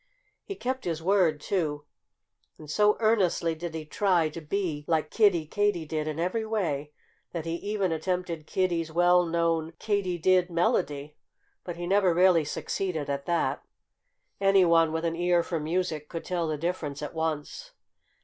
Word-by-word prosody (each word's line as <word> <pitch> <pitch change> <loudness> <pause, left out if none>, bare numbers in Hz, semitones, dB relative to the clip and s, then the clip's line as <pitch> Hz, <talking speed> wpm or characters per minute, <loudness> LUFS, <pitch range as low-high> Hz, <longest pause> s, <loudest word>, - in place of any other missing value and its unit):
He 395 - -6
kept 260 -3 -3
his 165 -2 -3
word, 180 -5 +3
too. 150 -4 -2 0.7
And 155 - -12
so 210 +8 +3
earnestly 195 -7 +2
did 160 0 -6
he 155 -1 -5
try 175 -1 +2
to 165 +2 -8
be 155 -2 -2
like 160 -2 0
Kiddie 195 -8 +3
Katydid 160 -5 -1
in 155 0 -3
every 185 +7 -1
way 165 -10 -2 0.4
that 170 -2 -4
he 165 - -2
even 200 -2 -1
attempted 170 -1 -2
Kiddie's 170 -4 0
well 175 +2 +4
known 165 -1 0
Katy 200 -4 -1
did 180 +1 +3
melody. 150 -4 0 0.5
But 175 - -6
he 175 0 -5
never 190 -2 +3
really 180 -3 +5
succeeded 155 -1 -3
at 140 0 -4
that. 170 -1 0 0.8
Anyone 175 -5 +4
with 160 +1 -2
an 165 0 0
ear 175 0 +2
for 165 -1 -3
music 155 -1 -2
could 165 - -6
tell 175 -2 -1
the 155 -1 -2
difference 150 -3 -3
at 150 - -5
once. 160 - -3
170 Hz, 160 wpm, -27 LUFS, 155-185 Hz, 0.8 s, really